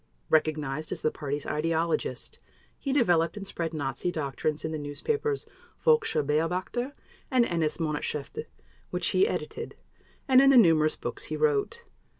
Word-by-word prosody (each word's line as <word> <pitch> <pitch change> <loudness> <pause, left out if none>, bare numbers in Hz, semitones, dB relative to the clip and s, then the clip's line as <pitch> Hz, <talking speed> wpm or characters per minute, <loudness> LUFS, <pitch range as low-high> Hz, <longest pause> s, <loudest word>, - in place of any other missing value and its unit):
Recognized 155 -1 +1
as - - -4
the 155 - +2
Party's 145 -1 -4
ideologist, 165 +2 -1 0.4
he 275 - -2
developed 175 - +3
and 200 - -5
spread 170 -4 -3
Nazi 145 +2 -2
doctrines 150 -1 -2
in 160 - -2
the 155 - -3
newspapers 425 - -2 0.4
Völkischer 460 - +3
Beobachter 180 - -1 0.4
and 255 -4 +4
NS 165 -5 0
Monatshefte, 150 - -3 0.4
which - - -1
he 390 - +4
edited, - - -4 0.5
and 260 0 +7
in 275 - +6
the 270 - +7
numerous 160 -7 +5
books - - -5
he - - -3
wrote. 455 +1 +1
165 Hz, 145 wpm, -28 LUFS, -, 0.5 s, and